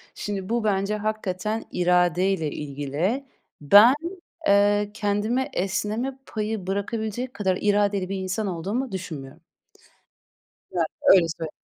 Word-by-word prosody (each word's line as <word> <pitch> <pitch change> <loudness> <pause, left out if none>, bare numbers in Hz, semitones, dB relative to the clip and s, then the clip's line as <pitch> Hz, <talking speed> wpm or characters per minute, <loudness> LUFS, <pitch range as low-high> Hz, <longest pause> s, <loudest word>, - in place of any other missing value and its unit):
Şimdi 200 -1 -4
bu 235 -1 0
bence 200 0 +1
hakikaten 215 0 -2
iradeyle 180 -1 +2
ilgili. 150 - -2 0.4
Ben, 205 - +8 0.5
eee, 205 +1 +3
kendime 215 +5 0
esneme 215 +8 -2
payı 215 -3 -4
bırakabilecek 220 +5 -3
kadar 190 -3 0
iradeli 205 -2 +1
bir 195 - -2
insan 190 +3 -2
olduğumu 200 +9 -3
düşünmüyorum. 155 -8 -7 1.3
Yani, 170 -2 +1 0.2
öyle 175 -3 +6
söyleyeyim, - - -7
yani. 160 -2 -3
200 Hz, 115 wpm, -24 LUFS, 180-215 Hz, 1.3 s, Ben